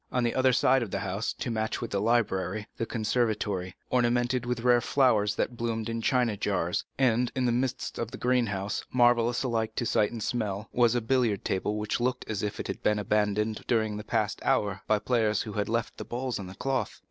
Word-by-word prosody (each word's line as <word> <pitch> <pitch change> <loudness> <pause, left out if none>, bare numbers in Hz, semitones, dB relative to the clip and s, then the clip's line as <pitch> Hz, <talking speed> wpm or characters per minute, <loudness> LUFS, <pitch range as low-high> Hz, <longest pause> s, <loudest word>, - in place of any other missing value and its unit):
On 125 - +1
the 120 - +1
other 130 0 +4
side 130 +1 +4
of 115 - -3
the 100 - -3
house, 100 +2 -2
to 120 - -4
match 110 0 -1
with 120 - -5
the 100 - 0
library, 105 -3 +1
was 105 - -18
the 115 - 0
conservatory, 105 -5 -1 0.2
ornamented 120 0 +1
with 125 -1 -1
rare 120 0 +4
flowers, 110 -7 +2
that 125 - -1
bloomed 115 -1 -2
in 115 0 -2
china 120 -2 +2
jars; - - -1
and 125 -2 +2
in 130 -1 +1
the 120 - +3
midst 125 +1 -2
of 115 - -2
the - - -8
greenhouse, 110 -6 0
marvellous 120 -1 +3
alike 115 -3 -1
to 120 - -1
sight 105 -2 +2
and 115 -3 -5
smell, 105 -3 -2
was 120 -1 +3
a 120 - +1
billiard 115 -4 +1
table 105 +3 -1
which 105 +2 -2
looked 125 +1 -1
as 110 -3 -2
if 105 -1 -3
it - - -3
had - - -5
been 105 - +2
abandoned 105 +1 0
during 110 -3 +1
the 105 - -5
past 110 -2 -1
hour 100 -2 +1
by 110 - +4
players 110 -2 +1
who 105 - -7
had 105 -1 -1
left 115 0 -1
the - - -5
balls 125 -1 -3
on 95 - -6
the 95 - -10
cloth. 130 -1 -2
115 Hz, 220 wpm, -28 LUFS, 105-120 Hz, 0.2 s, other